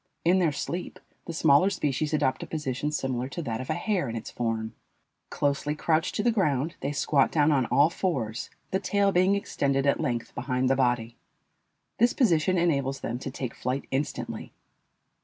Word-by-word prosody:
In 180 +3 +5
their 170 -4 +3
sleep 170 +5 -4 0.3
the - - -5
smaller 155 +3 +5
species 150 -5 -1
adopt 140 -4 +1
a - - -6
position 150 -1 -2
similar 130 -3 -2
to 170 - -5
that 115 -3 -3
of 130 - -8
a 155 - +1
hare 175 - -1
in 115 - -4
its 115 - -6
form. 115 -2 -2 0.6
Closely 145 +1 0
crouched 160 +1 0
to 210 - 0
the 240 - +4
ground, 160 - +1
they 140 - -2
squat 140 -1 +2
down 150 -1 +3
on 130 -5 +2
all 145 +4 +4
fours, 125 - -2 0.2
the 190 - +1
tail 200 0 +2
being 185 +2 +3
extended 140 -8 0
at 140 - +2
length 120 -6 -2
behind 130 0 0
the - - +4
body. 120 -3 0 0.8
This 240 +2 +4
position 185 - +3
enables 140 -6 +1
them 120 +1 -3
to 135 - -5
take 130 -2 -5
flight 130 +2 -3
instantly. 140 +2 -3
145 Hz, 180 wpm, -27 LUFS, 130-170 Hz, 0.8 s, In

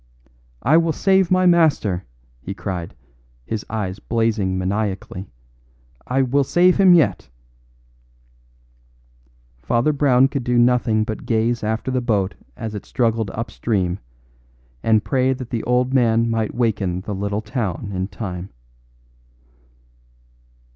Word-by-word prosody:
"I 150 +6 +5
will 165 -1 +2
save 190 0 +2
my 185 0 +3
master," 155 - +3 0.4
he 95 +8 -6
cried, 90 -4 -5 0.5
his 110 -2 -3
eyes 105 -3 -3
blazing 110 -5 0
maniacally. 95 0 -3 0.8
"I 135 +2 +2
will 135 +2 +2
save 175 +6 +3
him 190 -3 +7
yet!" 165 - +1 2.3
Father 120 - +1
Brown 135 -2 +4
could 135 -1 -4
do 125 0 +1
nothing 120 -2 +3
but 110 +2 -6
gaze 115 0 0
after 110 +4 -2
the 130 -1 0
boat 105 -5 0 0.2
as 110 -3 -5
it 105 - -6
struggled 115 -3 0
up 115 +2 -5
stream 95 -7 -1 0.8
and 110 -1 +3
pray 130 -1 +2
that 130 -2 -8
the 115 - -1
old 125 +1 +1
man 115 -2 +3
might 110 -2 -1
waken 100 -7 0
the 105 +2 -5
little 100 +2 -2
town 105 - -3
in 95 0 -2
time. 95 -2 -6
115 Hz, 125 wpm, -21 LUFS, 100-130 Hz, 2.3 s, him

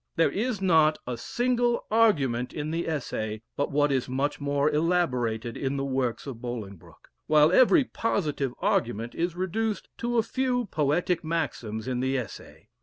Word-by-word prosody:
There 165 - +3
is 215 -2 -2
not 160 -4 +4
a 125 - -3
single 240 - 0
argument 140 - +2
in 150 0 -3
the 165 +1 -2
Essay 110 -8 -3
but 145 - -1
what 145 0 +2
is 130 -2 0
much 145 +3 -1
more 145 0 +1
elaborated 130 -8 0
in 140 0 -2
the 135 - -1
works 130 -3 -1
of 125 -5 -7
Bolingbroke, 110 -7 -8 0.2
while 155 +1 +5
every 260 - +6
positive 155 - -1
argument 120 - 0
is 170 0 -2
reduced 210 +4 -2
to 240 0 -1
a 225 - +4
few 250 0 0
poetic 165 +1 0
maxims 130 -9 -3
in 125 -1 -1
the 130 +1 0
Essay. 120 -6 -8
150 Hz, 160 wpm, -27 LUFS, 125-185 Hz, 0.2 s, every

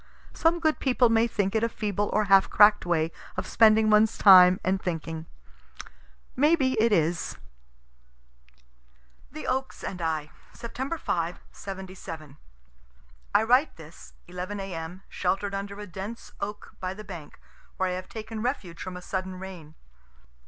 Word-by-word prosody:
Some 335 +1 +2
good 315 -2 +1
people 250 -2 +3
may 225 +1 +3
think 200 -4 -1
it 220 0 +1
a 230 - +2
feeble 205 -2 -2
or 215 - +2
half 195 -1 +5
crack'd 210 -2 +5
way 165 -2 +1 0.3
of - - -2
spending 220 -1 +4
one's 215 +1 +4
time 185 -2 +8
and 190 +1 0
thinking. 165 -2 -4 1.1
May 300 +5 +4
be 265 -5 +1
it 230 0 +3
is. 165 -3 0 1.9
THE 310 +3 -8
OAKS 265 +1 -3
AND 180 -2 -5
I 155 -2 -2 0.2
Sept. 265 +7 -5
5, 170 +1 -2
'77. 185 -6 -9 1.0
I - - +6
write 250 +7 +3
this, 160 0 -14
11 180 +3 -6
A.M., 180 -1 -6
shelter'd 195 +2 -2
under 200 +1 -5
a 210 - -6
dense 200 +5 -8
oak 210 +1 -6
by 185 0 -4
the 215 - -9
bank, 175 -7 -10 0.4
where 190 - +1
I - - -1
have 185 0 -6
taken 220 0 -6
refuge 210 -9 -3
from 185 -1 -6
a 180 - -10
sudden 185 0 -4
rain. 180 -5 -10
195 Hz, 150 wpm, -27 LUFS, 180-220 Hz, 1.9 s, time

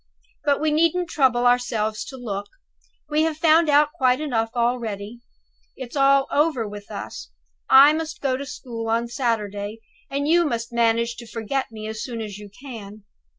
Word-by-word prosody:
But 285 -1 +2
we 310 0 +1
needn't 335 +3 +1
trouble 245 -4 +2
ourselves 235 -3 +1
to 265 - -9
look; 205 -5 -5 0.6
we 300 0 +1
have 320 -1 0
found 325 0 +4
out 295 +1 +4
quite 255 -5 +2
enough 235 -7 -1
already. 235 -2 -2 0.6
It's 260 -1 -8
all 275 0 +4
over 290 -7 +1
with 205 0 -9
us. - - -7 0.4
I 280 +3 +8
must 320 0 -4
go 270 -2 0
to 280 +2 -5
school 235 -5 -6
on 230 +1 +1
Saturday, 215 -4 -2 0.3
and 280 +1 -2
you 345 +2 +4
must 235 -5 -3
manage 235 0 +1
to 235 - -10
forget 230 +4 -3
me 215 -1 -7
as 220 0 -5
soon 235 -3 -5
as 210 -2 -6
you 205 -1 -10
can. 215 -3 -10
245 Hz, 170 wpm, -23 LUFS, 225-290 Hz, 0.6 s, I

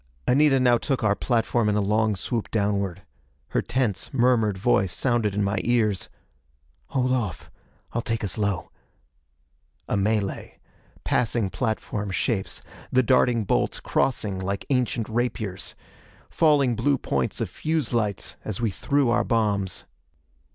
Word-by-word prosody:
Anita 135 +1 +4
now 120 -2 +4
took 135 -5 -1
our 105 -2 +4
platform 115 0 +1
in 105 - +1
a - - +2
long 105 +1 +2
swoop 115 +3 -2
downward. 100 -3 -1 0.5
Her - - +1
tense, 110 -8 -1
murmured 120 -6 +2
voice 95 -2 +2
sounded 115 -4 0
in 105 - +1
my 100 +2 0
ears: 110 -5 +1 0.8
"Hold 130 -1 0
off: 110 -10 -2 0.4
I'll 120 - 0
take 115 -1 -2
us 100 - -3
low." 100 -5 -2 1.2
A - - 0
melee. 100 0 -1 0.5
Passing 115 -4 0
platform 105 0 -2
shapes. 95 +3 -2 0.3
The 130 0 +4
darting 125 -2 +3
bolts, 95 - 0
crossing 105 -7 0
like 100 +1 -3
ancient 125 -3 0
rapiers. 110 -5 -2 0.6
Falling 145 -6 +3
blue 135 +5 +2
points - - -2
of - - -1
fuse 155 -6 -2
lights 105 -4 -1
as 105 -3 -4
we 115 -3 0
threw 140 +4 +1
our 120 - +3
bombs. 100 -5 0
110 Hz, 135 wpm, -25 LUFS, 100-125 Hz, 1.2 s, Anita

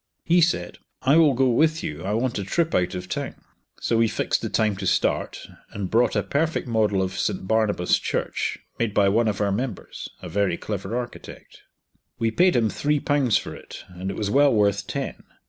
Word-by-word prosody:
He 175 +1 +4
said 170 +1 0 0.2
"I 135 +3 +4
will 155 -5 +5
go 130 +1 +3
with 155 +6 +2
you, 75 +2 -5
I 100 +2 -2
want 115 0 -1
a - - -2
trip 165 - 0
out 90 0 +1
of 90 0 -5
town," - - -4 0.4
so 115 - 0
we 115 0 +4
fixed - - -1
the - - -3
time 110 -2 +1
to - - -3
start, - - 0 0.2
and 100 -3 -5
brought 115 +1 +3
a 105 - +1
perfect 145 - -1
model 105 -4 +1
of 95 0 -4
St 95 -2 -2
Barnabas 110 -5 +2
Church, - - -2 0.2
made 115 -3 -1
by 100 -1 +4
one 115 +3 +2
of 105 -2 -1
our 100 -1 +1
members 110 0 -4
(a - - -8
very 100 -4 0
clever 105 +2 -4
architect). 120 -1 -8 0.6
We 115 -1 0
paid 180 +7 +3
him 115 -2 +3
three 150 0 0
pounds 140 -7 +2
for - - -6
it, - - -11
and 90 +1 -6
it 95 - -5
was 105 -1 -2
well 140 +1 +5
worth 100 -1 +2
ten. 140 -1 -4
110 Hz, 205 wpm, -24 LUFS, 100-135 Hz, 0.6 s, will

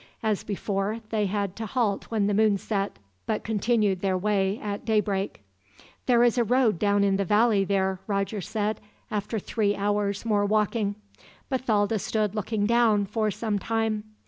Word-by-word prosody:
As 215 -2 0
before, 205 +2 -2
they 210 -2 +1
had 200 -1 -2
to 220 -1 -4
halt 215 -4 0
when 220 -3 0
the 205 - +1
moon 210 -1 +3
set, 200 0 -2 0.3
but 215 -1 -1
continued 210 -3 +1
their 190 -2 +1
way 200 +1 0
at 205 -1 -4
daybreak. 205 - -1 0.6
"There 240 -2 +5
is 245 +1 +3
a - - +4
road 235 -5 +2
down 205 -1 +3
in 195 -1 +2
the 200 - +1
valley 210 +1 +3
there," 190 -1 0
Roger 200 0 -1
said, 215 +3 -2 0.3
after 210 +2 -2
three 205 0 0
hours' 205 +1 -1
more 210 -3 +2
walking. 210 0 +1 0.6
Bathalda 220 -5 +1
stood 210 0 -1
looking 215 0 -1
down, 225 -3 +3
for 215 +2 -1
some 210 0 -2
time. 220 0 -1
210 Hz, 165 wpm, -26 LUFS, 200-220 Hz, 0.6 s, There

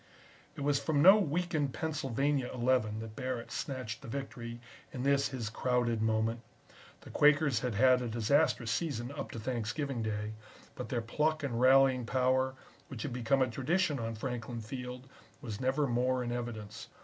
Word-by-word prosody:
It 150 - -7
was 140 0 +2
from 145 -2 +1
no 190 +4 +9
weakened 160 -5 -1
Pennsylvania 140 -3 -1
Eleven 120 -3 +1
that 110 -1 -8
Barrett 125 -2 -4
snatched 130 -5 -4
the - - -10
victory 120 -2 -6 0.3
in 125 - -5
this 140 0 +3
his 125 -5 -4
crowded 120 0 0
moment. 110 +1 +1 0.6
The - - -12
Quakers 145 -4 +4
had 125 -3 -2
had 130 +2 +5
a 125 - -2
disastrous 115 +1 +2
season 125 -3 -2
up 140 - -5
to 115 - -6
Thanksgiving 120 +3 -2
Day, 105 0 -3 0.4
but - - -7
their 120 - -1
pluck 150 +7 0
and 120 -4 -2
rallying 130 -1 +5
power, 130 +1 +1 0.3
which 125 -5 -6
has 145 - -3
become 130 +2 +2
a - - 0
tradition 145 +5 0
on 115 0 -3
Franklin 120 0 -4
Field, 125 +2 -7 0.3
was 115 -6 -6
never 135 +3 +1
more 125 0 +1
in 120 - -3
evidence. 115 -2 -5
125 Hz, 165 wpm, -32 LUFS, 115-140 Hz, 0.6 s, no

